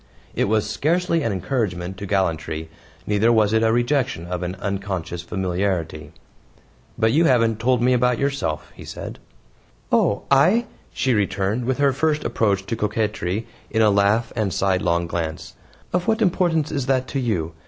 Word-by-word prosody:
It - - +1
was 110 +1 +1
scarcely 170 +2 +1
an 115 - 0
encouragement 95 -3 -2
to 100 - -6
gallantry, 80 -4 -1 0.3
neither 105 +3 +3
was 110 -2 +3
it 110 - +3
a 110 0 +3
rejection 120 - 0
of 90 0 -4
an 90 +1 -3
unconscious 95 -3 -4
familiarity. 90 -4 -2 0.9
"But 110 0 +3
you 160 +6 +4
haven't 115 -5 +3
told 125 +1 +2
me 125 +1 +4
about 125 -1 +2
yourself," 135 - -2
he - - -12
said. - - -8 0.7
"Oh, 100 - +2
I," 180 - +5 0.3
she 130 +3 0
returned, 100 +3 0
with 130 +1 0
her 140 -1 +3
first 155 +2 0
approach 100 -3 0
to 115 - -2
coquetry 105 -2 -1 0.2
in 110 - +2
a 105 - +5
laugh 100 +3 +2
and 110 -3 0
a - - -5
sidelong 90 -3 +1
glance, 85 -2 -4 0.4
"of 180 0 0
what 225 0 +2
importance 170 -5 +1
is 140 -4 -2
that 130 -1 +1
to 135 - -2
you? 90 -10 -1
110 Hz, 165 wpm, -22 LUFS, 95-130 Hz, 0.9 s, I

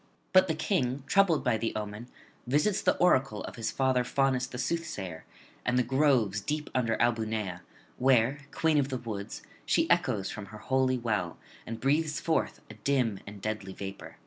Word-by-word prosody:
But 185 0 +7
the 160 - 0
King, 140 -6 0
troubled 175 0 +3
by 120 -4 +1
the 115 - -2
omen, 105 +2 -5 0.4
visits 150 +10 +2
the - - +2
oracle 135 -11 +3
of - - -7
his 115 -2 -2
father 130 -2 +2
Faunus 130 0 +1
the 125 - -8
soothsayer, 115 - -3 0.4
and 125 0 +1
the 125 - +4
groves 125 -6 +2
deep 150 +7 -3
under 115 -3 +1
Albunea, 110 -6 0 0.4
where, 130 +1 +3
queen 160 -2 +2
of 140 -1 0
the 130 - -2
woods, 110 -5 -6 0.2
she - - +2
echoes 95 -2 +1
from 105 -2 -7
her 110 - -10
holy 130 +3 +1
well, 105 -8 -2 0.3
and 115 0 -5
breathes 150 +4 +1
forth 160 - -1
a - - -10
dim 115 -2 0
and 100 -1 -10
deadly 105 -3 -3
vapour. 100 0 -8
125 Hz, 170 wpm, -29 LUFS, 110-140 Hz, 0.4 s, But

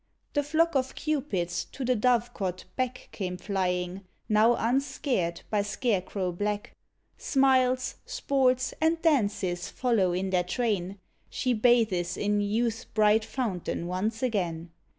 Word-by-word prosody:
The 290 - +2
flock 320 +3 +2
of 265 -1 0
Cupids 265 - -1
to 265 - -4
the 255 +1 +2
dovecot 225 -6 0
back 255 -1 -3
Came 180 -3 -4
flying, 180 -1 -2 0.3
now 220 +3 +4
unscared 240 - 0
by 210 -1 +2
scarecrow 200 -3 -1
black. 205 +3 -3 0.5
Smiles, 260 -2 +2
sports, 255 -2 +1
and 325 +1 +3
dances 200 - +1
follow 225 -8 +1
in 185 +2 -1
their 180 -1 +2
train, 195 -1 -1 0.3
She 255 -2 0
bathes 215 -7 +2
in 205 0 +1
youth's 225 +3 0
bright 215 0 +3
fountain 210 -8 -3
once 210 +6 -2
again. 175 -8 -1
215 Hz, 125 wpm, -28 LUFS, 185-255 Hz, 0.5 s, now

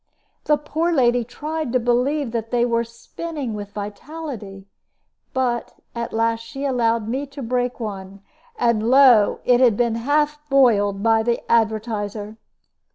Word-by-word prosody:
The 300 - +3
poor 315 +4 -1
lady 245 -5 +3
tried 305 +3 -4
to 255 - +3
believe 250 +3 0
that 225 -1 -3
they 240 0 +2
were 235 -1 +1
spinning 255 +3 -6
with 205 -1 -6
vitality; 210 -1 -7 0.7
but 250 -3 -1 0.2
at 235 0 -4
last 225 0 +1
she 230 +5 -7
allowed 230 -4 +1
me 265 +5 -2
to 275 0 -8
break 245 +1 -1
one, 200 -3 -7 0.3
and 235 -2 +1
lo! 255 -6 +6
it 245 -1 +4
had 240 -5 +4
been 235 -2 +1
half 295 +5 0
boiled 205 -7 +3
by 225 -1 +4
the 235 +1 0
advertiser. 220 -2 -1
235 Hz, 145 wpm, -21 LUFS, 220-270 Hz, 0.7 s, lo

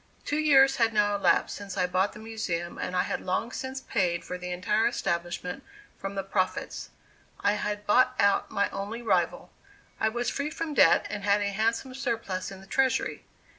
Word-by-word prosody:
Two 295 - 0
years 270 -3 +5
had 225 -2 +2
now 205 -1 +3
elapsed 200 - +2
since 200 -1 -7
I 180 - +3
bought 185 +2 +1
the - - -11
Museum 195 -6 -4
and 180 - -3
I 180 - +3
had - - -3
long 185 +6 -1
since 265 +1 -5
paid 180 -9 0
for 180 - -5
the 180 0 -6
entire 210 +5 +1
establishment 175 +2 -3 0.3
from 195 0 -6
the 195 - -2
profits; 190 -1 -2 0.5
I 205 - +3
had 210 0 -3
bought 255 +4 +4
out 200 0 +3
my 200 - +1
only 210 +4 -5
rival; 185 -6 0 0.5
I 220 - +2
was 240 +2 -2
free 285 +1 -1
from 320 0 -4
debt, 165 - +5
and 205 -1 -4
had 205 0 +3
a 200 - 0
handsome 225 +5 -1
surplus 230 -8 -3
in 195 -1 -10
the - - -13
treasury. 260 +6 0
205 Hz, 190 wpm, -28 LUFS, 185-240 Hz, 0.5 s, years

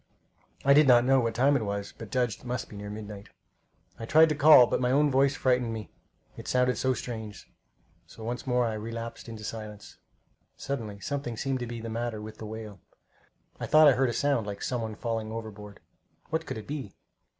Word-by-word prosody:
I 140 - +7
did 150 0 +6
not 120 -1 +6
know 135 0 +4
what 115 -2 -1
time 135 +4 +4
it 125 - +1
was, 100 -1 -4
but 115 - -9
judged 120 -1 0
it - - -18
must 125 0 -4
he - - -9
near 105 0 -7
midnight. 105 -1 -8 0.7
I 115 - -6
tried 160 +3 +6
to 150 - 0
call, 145 -3 +8
but - - -1
my 125 - +1
own 145 +2 +3
voice 135 +1 +3
frightened 125 -2 +1
me 110 -2 -6 0.4
it - - -10
sounded 125 0 +2
so 130 -1 +1
strange; 110 -4 -7 0.6
so 110 - -12
once 120 +3 -4
more 125 -1 +2
I 115 - -1
relapsed 115 +2 -6
into 110 -1 -8
silence. 105 -1 -8 0.6
Suddenly 110 -7 -5
something 140 -4 -4
seemed 135 +2 -1
to 120 - -4
be 115 -1 -6
the 115 - -6
matter 115 -1 -3
with 110 0 -9
the 110 - -6
whale. 110 -2 -8 0.8
I - - -4
thought 155 0 +7
I - - +8
heard 130 0 +2
a - - -2
sound 140 -7 0
like 100 -1 -6
some 125 -2 -2
one 110 -1 -4
falling 115 -1 -3
overboard. 105 -2 -8 0.5
What 160 -1 -2
could - - -4
it 110 - -8
be? 140 -9 -6
115 Hz, 210 wpm, -28 LUFS, 110-130 Hz, 0.8 s, call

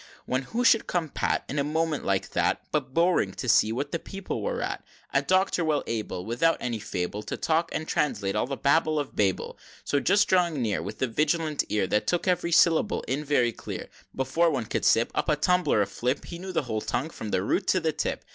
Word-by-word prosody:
XXX. - - -19 0.2
When 130 +1 0
who 230 - -2
should 225 - +5
come 170 -3 -1
pat, - - -1
In 145 - -2
a - - +2
moment 155 +1 -1
like 95 -1 0
that, - - 0
But 140 -4 -1
Bowring, 170 +5 +2
to 125 - -5
see 110 -1 +4
what 140 +5 -3
the 170 - -1
people 195 +3 -5
were - - -2
at - - -3 0.3
A - - +4
Doctor 185 -2 +2
well 155 -2 +1
able, 105 -5 -4
Without 125 +9 +2
any 120 -3 -3
fable, 100 0 -3
To - - -5
talk 165 +1 +1
and 160 - -3
translate 100 -9 0
all 105 - 0
the 135 0 -4
babble 155 +2 +2
of 145 -2 -3
Babel. 95 -3 0
XXXI. - - -21
So 145 - +1
just 200 +7 +3
drawing 175 -5 +2
near, 110 -4 0
With 110 - -7
a - - +2
vigilant 155 +4 0
ear, 105 -2 +1
That 105 +3 0
took 175 +1 0
ev'ry 180 -1 +1
syllable 165 -1 +3
in, 140 +4 -2
very 130 -5 +2
clear, - - -7 0.3
Before 135 +6 +2
one 130 -7 -1
could - - -2
sip 115 - +3
Up - - -1
a 150 - +4
tumbler 180 - +2
of 100 - -6
flip, 125 +4 -2
He 170 - -8
knew 190 +1 -6
the 175 - 0
whole 110 -4 -3
tongue, 145 +9 -2
from 110 - -7
the 95 - 0
root - - 0
to - - +3
the - - 0
tip! - - -3
145 Hz, 235 wpm, -27 LUFS, 115-170 Hz, 0.3 s, should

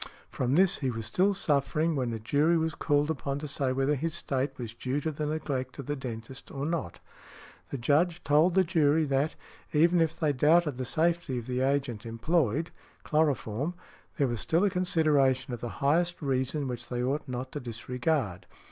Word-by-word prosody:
From 130 +2 0
this 185 +1 +4
he 135 - 0
was 115 -2 -4
still 185 - +2
suffering, 155 -1 +1
when 125 -4 -1
a 115 - -3
jury 145 +9 +2
was 160 0 0
called 145 0 +1
upon 140 -2 -3
to 150 +1 -5
say 140 -2 -1
whether 135 +2 +1
his 155 +3 -2
state 135 -3 -2
was 120 -2 -6
due 130 +4 -2
to 155 +2 -2
the 150 0 -3
neglect 140 -4 -3
of 140 - -6
the 145 - -2
dentist 130 -1 -7
or 140 0 -4
not. 160 - -3 0.7
The 140 - -3
Judge 160 +7 +1
told 150 +5 +4
the 190 - +5
jury 160 -3 +3
that, 140 +2 0 0.4
even 170 +3 +4
if 160 0 0
they 150 -3 +2
doubted 150 +1 +3
the 130 - -3
safety 165 -1 0
of 120 - -5
the 125 0 -2
agent 135 -4 0
employed 145 +5 0 0.3
(chloroform), 150 -1 0 0.4
there 145 - +3
was 120 -2 -2
still 165 - +1
a 205 - +3
consideration 150 -8 +2
of 120 - -5
the 120 - -3 0.2
highest 170 +4 +2
reason 135 0 -1
which 120 -1 -5
they 125 0 -2
ought 140 +4 -1
not 130 0 -5
to 145 - -4
disregard. 125 - -2
145 Hz, 190 wpm, -29 LUFS, 130-160 Hz, 0.7 s, the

